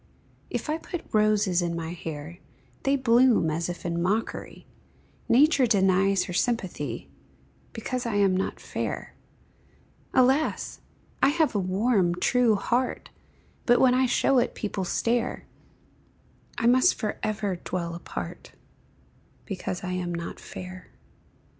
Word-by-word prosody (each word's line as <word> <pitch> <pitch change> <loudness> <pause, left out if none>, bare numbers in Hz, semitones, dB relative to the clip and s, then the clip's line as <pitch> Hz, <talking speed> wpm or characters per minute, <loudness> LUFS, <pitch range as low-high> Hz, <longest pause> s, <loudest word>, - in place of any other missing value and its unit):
If - - -3
I 310 +2 -1
put 350 0 -6
roses 210 -4 +3
in 170 -1 -1
my 165 -1 -4
hair, 160 0 -7 0.4
They 275 +1 +2
bloom 240 - +4
as 165 +2 -2
if 175 - -7
in 170 0 -1
mockery; 205 +6 -2 0.6
Nature 275 +1 +5
denies 195 -2 +3
her 180 - -6
sympathy, 175 - -2 0.6
Because 245 +2 -4
I 225 - -2
am 200 -2 +3
not 190 - -2
fair; - - -4 1.0
Alas! 265 +4 +2 0.4
I - - +6
have 315 +1 +2
a 205 - +1
warm, 190 -1 +1
true 235 +4 +3
heart, 245 +5 -1 0.6
But 240 0 +5
when 255 -1 +5
I 255 0 +3
show 260 +1 +3
it 245 - -1
people 200 -3 -3
stare; 235 +5 -1 1.1
I 235 - -1
must 255 +2 +5
forever 210 -2 -2
dwell 170 -1 -4
apart, 170 - -7 0.9
Because 190 -2 -4
I 185 - -3
am 180 -1 -2
not 170 0 -6
fair. 185 0 -9
205 Hz, 130 wpm, -26 LUFS, 180-245 Hz, 1.1 s, I